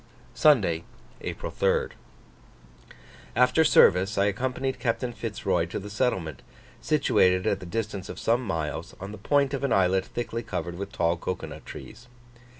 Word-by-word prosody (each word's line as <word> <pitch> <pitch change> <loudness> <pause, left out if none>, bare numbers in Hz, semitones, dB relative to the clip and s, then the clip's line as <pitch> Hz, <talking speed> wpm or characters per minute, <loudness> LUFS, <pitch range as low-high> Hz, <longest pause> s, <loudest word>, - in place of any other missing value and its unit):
Sunday, 100 - +4 0.4
April - - -5
3rd. - - +1 1.4
After 125 +6 +4
service 95 - +5
I 100 - +4
accompanied 130 +5 -1
Captain 120 0 -1
Fitz 110 -2 -6
Roy - - +2
to - - -5
the 105 +1 -7
settlement, 95 - -1 0.4
situated 95 -11 +3
at - - +1
the 90 - -9
distance 105 -1 -4
of - - -7
some 115 +2 +1
miles, 80 -8 -3
on 100 +2 -7
the 105 - -9
point 140 +5 +2
of 140 - -2
an 140 - 0
islet 95 -1 +3
thickly 115 -1 -4
covered 90 -5 -4
with 100 0 -5
tall 85 -4 +1
cocoa 90 +2 -4
nut - - -10
trees. 125 - -10
105 Hz, 155 wpm, -27 LUFS, 90-125 Hz, 1.4 s, service